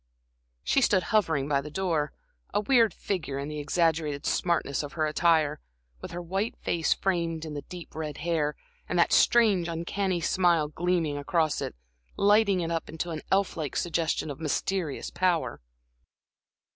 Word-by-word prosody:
She 275 - +2
stood 195 -7 +3
hovering 160 -10 +2
by 140 -2 +1
the 150 - -8
door, 160 -4 -1 0.4
a - - +4
weird 225 0 +4
figure 165 -10 -3
in 140 +1 -4
the 150 0 -5
exaggerated 155 -1 0
smartness 170 -5 0
of 145 -1 -7
her 160 -2 0
attire, 155 -1 +2 0.4
with - - -6
her 175 +1 -6
white 195 +6 -2
face 165 -2 -1
framed 170 -4 0
in 155 - -6
the 145 - -4
deep 175 +2 -10
red 155 -2 -5
hair, 160 -3 0 0.3
and 180 - 0
that 170 - +4
strange, 210 -7 +4
uncanny 175 +2 -1
smile 170 -3 +2
gleaming 165 -2 0
across 155 +1 0
it, - - -4 0.4
lighting 200 -2 +4
it 165 0 -2
up 165 -1 -2
into 160 +2 -4
an 155 -2 -4
elf 195 0 +2
like 155 -4 -4
suggestion 165 -3 -1
of 140 - -8
mysterious 165 0 -2
power. 180 - 0
165 Hz, 160 wpm, -28 LUFS, 150-180 Hz, 0.4 s, a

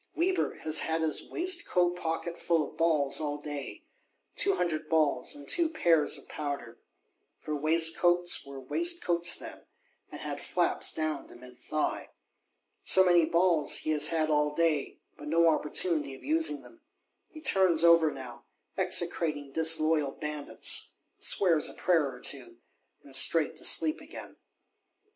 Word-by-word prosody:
Weber 365 +3 -1
has 155 0 +2
had 160 0 -2
his 155 -1 0
waistcoat 340 - 0
pocket 170 0 -4
full 165 -3 0
of - - -15
balls 155 -4 +1
all 145 -1 -3
day; 145 - -8 0.5
"two 395 - +2
hundred 155 -3 -3
balls, 155 -3 0
and 145 -1 -12
two 340 -2 +2
pears 165 - +1
of - - -14
powder!" 140 -6 -6 0.6
For 155 - -5
waistcoats 165 +3 +3
were 140 -1 -10
waistcoats 175 - 0
then, - - -10 0.5
and - - -9
had - - -6
flaps - - 0
down 155 -2 -4
to - - -15
mid 125 0 -15
thigh. 155 - -3 0.7
So 190 0 +5
many 175 -2 +4
balls 170 -3 +2
he 155 - 0
has 150 -1 +3
had 160 -1 -1
all 150 0 0
day; 160 -4 -1 0.2
but 145 - -9
no 165 +2 +3
opportunity 150 -2 0
of - - -17
using 315 0 0
them: 340 -1 -18 0.5
he 315 - -12
turns 185 - +3
over 170 -2 +5
now, 125 -4 -10 0.3
execrating 170 -5 -1
disloyal 155 -2 +2
bandits; 150 -2 -2 0.3
swears 165 -5 +2
a - - -11
prayer 165 -6 +1
or - - -12
two, 355 0 -3 0.5
and - - -3
straight - - +4
to - - -10
sleep 310 0 +2
again. - - -12
160 Hz, 150 wpm, -28 LUFS, 150-175 Hz, 0.7 s, So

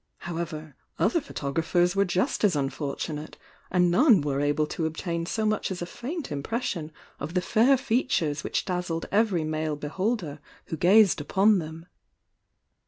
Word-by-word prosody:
However, 160 -4 -5 0.2
other 335 - +2
photographers 170 - 0
were 200 0 +3
just 180 +3 0
as 200 -6 +4
unfortunate, 145 +2 -3 0.3
and 180 -1 +3
none 230 - +5
were 140 -1 -1
able 145 +1 +1
to 160 +1 -2
obtain 170 +1 -3
so 220 +3 -1
much 215 -1 0
as 185 -2 -4
a 175 - -3
faint 255 - -6
impression 160 - -3 0.3
of 155 +6 -6
the - - +4
fair 240 +8 +4
features 225 - 0
which - - -1
dazzled 180 -3 -2
every 200 -5 +2
male 155 0 -2
beholder 155 +1 -2 0.3
who - - -4
gazed 190 +1 +5
upon 195 +7 +3
them. 160 0 -7
175 Hz, 150 wpm, -26 LUFS, 155-210 Hz, 0.3 s, none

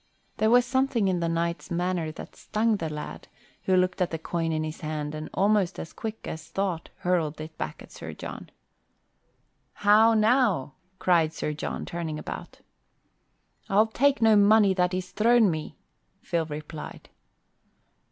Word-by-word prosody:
There 220 - +3
was 245 +1 +5
something 260 -4 +1
in 185 -2 +1
the 170 -1 0
knight's 170 0 -2
manner 175 -2 -1
that - - -10
stung 220 0 0
the 165 -4 -3
lad, 150 0 -7 0.4
who 190 - +3
looked 185 +1 +1
at 180 - +2
the 160 - -3
coin 165 0 -2
in 155 0 -1
his 155 0 -6
hand 155 -1 -3
and 155 0 -6
almost 200 -2 +2
as 165 - -7
quick 220 -1 -6
as 160 0 -7
thought 190 -4 -2
hurled 165 -4 0
it 155 +1 -8
back - - -5
at - - -16
Sir - - -8
John. - - -8 1.2
"How 215 +2 +5
now?" 215 - +2 0.2
cried 165 -4 +2
Sir 150 - -3
John, 150 - -4
turning 165 -3 -4
about. - - -8 1.1
"I'll 205 +3 +5
take 270 +3 +2
no 220 -1 +6
money 205 -1 +5
that 180 0 +1
is 185 0 -4
thrown 225 0 +4
me," 155 -1 -5 0.5
Phil 165 -2 -1
replied. 150 +1 -8
180 Hz, 160 wpm, -27 LUFS, 160-215 Hz, 1.2 s, no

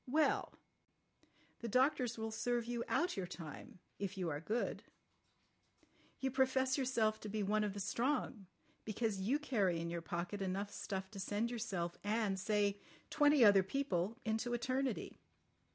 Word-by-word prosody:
Well. 305 +5 +2 1.1
The 235 - -4
doctors 250 0 +2
will 220 0 -3
serve 240 +1 0
you 240 0 -2
out 350 +2 +1
your 190 -3 -3
time—if 180 +3 -8
you 180 -3 -1
are 145 -1 -2
good. 215 +9 -1 1.4
You 265 0 0
profess 260 0 +2
yourself 230 -5 +1
to 215 - -6
be 210 0 -1
one 210 +2 +2
of 205 -2 -1
the - - -4
strong—because 215 -2 -2
you 240 +9 +2
carry 205 - +1
in 170 0 -3
your 170 0 -3
pocket 175 +4 -3
enough 195 +2 -2
stuff 190 0 -4
to 200 - -8
send 210 +4 -1
yourself 190 -8 -3
and, 205 -2 +1
say, 205 0 +1 0.3
twenty 290 -4 +6
other 200 -2 +8
people 200 -2 -1
into 225 +2 0
eternity. 255 0 -1
215 Hz, 145 wpm, -37 LUFS, 195-245 Hz, 1.4 s, other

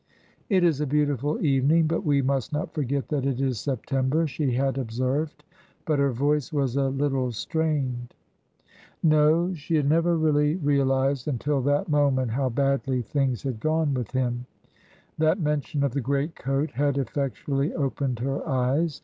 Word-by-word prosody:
"It 190 -4 +3
is 160 -4 +2
a 150 - 0
beautiful 145 0 0
evening, 145 +4 +3
but 165 +1 -1
we 140 -2 +2
must 135 -2 -1
not 150 0 -3
forget 140 -3 -2
that 145 -4 -1
it 135 -2 -1
is 130 -5 0
September," 135 +4 0
she 140 -3 -1
had 135 +1 0
observed. 130 +6 -2 0.4
But 155 -3 +1
her 140 -1 +3
voice 145 +4 0
was 135 -5 0
a 135 -1 +1
little 135 -2 0
strained. 130 -2 -2 0.9
No, 160 +3 +4
she 160 0 -3
had 145 -3 +2
never 165 +3 +3
really 150 -1 +2
realised 135 -4 +1
until 140 +1 0
that 145 +2 +1
moment 140 -5 +2
how 130 +2 0
badly 135 0 0
things 135 0 -1
had 130 -5 -3
gone 155 +1 +1
with 125 -4 -3
him; 125 -1 -2 0.7
that 160 +5 +3
mention 150 -2 -1
of 140 - +1
the 140 - -1
great 140 +5 -1
coat 135 +3 -1
had 140 +2 0
effectually 140 +2 -1
opened 135 -4 -1
her 135 +2 -1
eyes. 140 +4 0
140 Hz, 160 wpm, -25 LUFS, 130-150 Hz, 0.9 s, No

